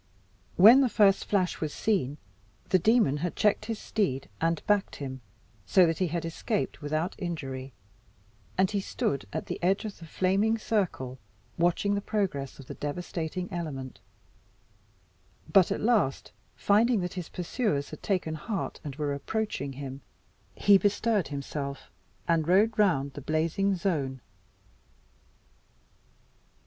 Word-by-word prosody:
When 225 +9 +9
the 260 - +3
first 205 -3 +4
flash 190 -3 0
was 155 -2 -1
seen 155 -11 0 0.5
the 185 - +4
demon 215 - +3
had 170 +3 -3
checked 210 -1 +2
his 225 -1 -3
steed 175 -15 -2
and 165 -1 +1
backed 205 -1 +1
him, 130 -2 -6 0.5
so 180 - +6
that 165 -1 0
he 185 - +2
had 170 0 -3
escaped 160 -3 -2
without 155 +5 -1
injury, 135 -7 -5 0.9
and 190 +1 +3
he 205 - 0
stood 140 - -2
at - - -3
the - - -5
edge 195 +4 +1
of 210 - -6
the 165 - -11
flaming 195 +7 +1
circle 180 - -2 0.4
watching 175 +4 +1
the 200 - 0
progress 190 - -2
of 135 - -11
the - - -7
devastating 170 +3 -4
element; 140 -7 -5 1.5
but 195 -3 +6
at - - -1
last, 215 - +1 0.2
finding 215 +1 +3
that 180 -1 -3
his 180 -3 -6
pursuers 175 - -2
had 155 - -9
taken 180 -5 -1
heart 170 +5 -4
and 145 -4 -6
were 145 -1 -1
approaching 140 -2 -3
him, 135 0 -7 0.5
he 200 -1 +6
bestirred 205 -1 +1
himself, 140 -1 -5 0.4
and 165 -2 +2
rode 210 +5 +4
round 140 -9 +2
the 145 - -7
blazing 165 +7 +1
zone. 150 -8 -1
175 Hz, 140 wpm, -28 LUFS, 145-200 Hz, 1.5 s, When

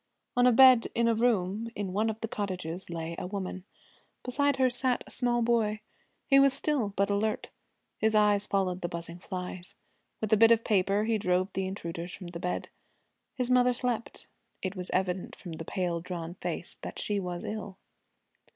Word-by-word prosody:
On 245 0 +5
a - - +7
bed 255 -1 +7
in 235 0 +3
a 230 - +4
room 220 -2 +1
in 195 -3 -3
one 215 +3 +1
of 220 0 -4
the 225 - -2
cottages 185 -5 -4
lay 165 0 -4
a - - -4
woman. 190 -1 -5 0.6
Beside 285 +2 +1
her 260 -1 +3
sat 250 0 +1
a - - -13
small 240 -1 +1
boy. 225 -2 +1 0.5
He 275 -1 +6
was 275 -1 +5
still, 275 -8 0
but 200 +1 +1
alert. 210 +2 -1 0.5
His 220 0 +2
eyes 210 -1 +4
followed 185 -2 0
the 175 - -2
buzzing 170 +1 -6
flies. 180 0 -4 0.4
With 220 0 0
a - - +6
bit 225 +2 +7
of 230 -1 +4
paper 200 0 +2
he 220 0 +1
drove 185 0 +1
the 190 -1 -1
intruders 170 -2 -5
from 180 -4 -9
the 170 -1 -7
bed. 180 +1 -3 0.7
His 255 -2 -1
mother 250 0 +4
slept. 240 -2 -3 0.4
It 190 +1 -2
was 180 -1 -4
evident 185 -1 -1
from 175 - -9
the 160 0 -6
pale, 175 -2 -2
drawn 170 -1 -5
face 180 - -4
that - - -7
she 205 -1 0
was 180 -2 -4
ill. 205 -3 -5
205 Hz, 190 wpm, -29 LUFS, 180-230 Hz, 0.7 s, a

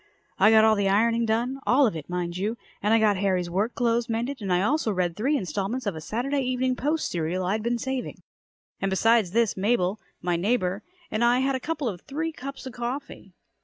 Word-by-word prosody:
I - - +7
got 220 0 +6
all 220 0 +6
the 200 -1 +1
ironing 230 +3 +2
done 240 +5 0
all 270 +3 +5
of 215 - 0
it, 155 0 -7
mind 175 -1 -3
you 210 +5 -2 0.2
and 210 - +1
I 225 - +6
got 215 -3 +3
Harry's 185 -3 0
work 205 +7 -1
clothes 235 0 +1
mended 235 +4 -2
and 195 -2 -3
I 180 +1 +3
also 270 -1 +1
read 180 -3 -1
three 275 +8 +1
installments 200 - -3
of 200 -5 -1
a 160 - -6
Saturday 250 - -1
Evening 255 0 0
Post 300 +5 -1
serial 175 +2 -1
I'd 205 +4 0
been 235 +2 0
saving. 265 +1 -4 0.6
And 195 - +1
besides 225 +1 +3
this 225 +2 +1
Mabel, 200 -1 +1 0.2
my 175 -1 0
neighbor, 195 0 0 0.3
and 215 +2 0
I 240 +2 +4
had 270 +1 +1
a - - -1
couple 300 -1 -3
or 190 -6 -3
three 315 - -4
cups 275 -2 -8
of 260 - -7
coffee. 240 -6 -6
225 Hz, 215 wpm, -26 LUFS, 190-250 Hz, 0.6 s, I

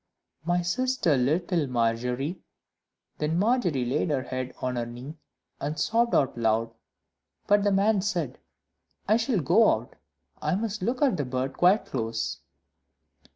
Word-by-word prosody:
"My 175 +1 +1
sister, 255 - +1
little 160 +5 +1
Margery," 125 +6 -1 0.8
Then 155 +2 0
Margery 190 - +1
laid 140 +7 0
her 135 -3 0
head 130 0 -4
on 125 0 -2
her 120 -1 -2
knee, 130 +7 -9 0.4
and 150 +2 -3
sobbed 235 +7 +2
out 135 - +2
loud; 115 0 +1 0.7
but 205 0 +3
the 205 - +2
man 200 +1 +3
said, 175 - -2 0.7
"I 215 +2 +4
shall 230 -4 0
go 220 +11 +5
out - - -2 0.5
I - - 0
must 210 0 -3
look 245 +8 0
at 275 - +3
the 145 - -1
bird 130 +1 -2
quite 185 +8 +3
close." 115 -3 -3
155 Hz, 145 wpm, -27 LUFS, 125-205 Hz, 0.8 s, go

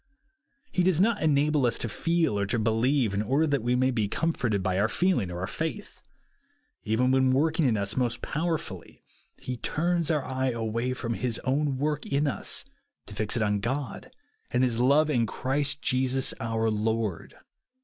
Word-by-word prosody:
He 185 - +1
does 180 -2 +2
not 210 +2 +2
enable 150 -3 +3
us 115 - 0
to - - -1
feel 165 -2 0
or 100 - 0
to 100 - 0
believe, 115 +1 +1
in 100 - 0
order 135 +9 +2
that 145 -4 0
we 120 +2 +1
may 130 +1 +2
be 110 -4 0
comforted 120 - -1
by 95 0 0
our 105 +2 +2
feeling 175 - +1
or 90 0 -5
our - - -1
faith. 160 - -5 0.8
Even 120 +3 +1
when 130 0 +3
working 155 +4 +2
in 115 -3 +2
us 100 0 -2
most 120 -2 0
powerfully 160 +1 -4 0.3
he 125 -1 -5
turns 170 +5 0
our 150 -4 0
eye 130 0 -1
away 115 +2 -2
from 115 -2 -3
his 120 -1 -2
own 140 +1 0
work 150 +2 -1
in 140 +2 +1
us, 145 - -2 0.4
to 105 - -9
fix 110 +3 -1
it 115 - +1
on 105 -1 +1
God, 125 +3 -4 0.4
and 125 +1 +1
his 120 -2 +1
love 145 +5 +4
in 120 -5 +2
Christ 140 +6 -1
Jesus 130 +1 +1
our 115 -1 0
Lord. 110 -3 -2
130 Hz, 180 wpm, -27 LUFS, 110-150 Hz, 0.8 s, love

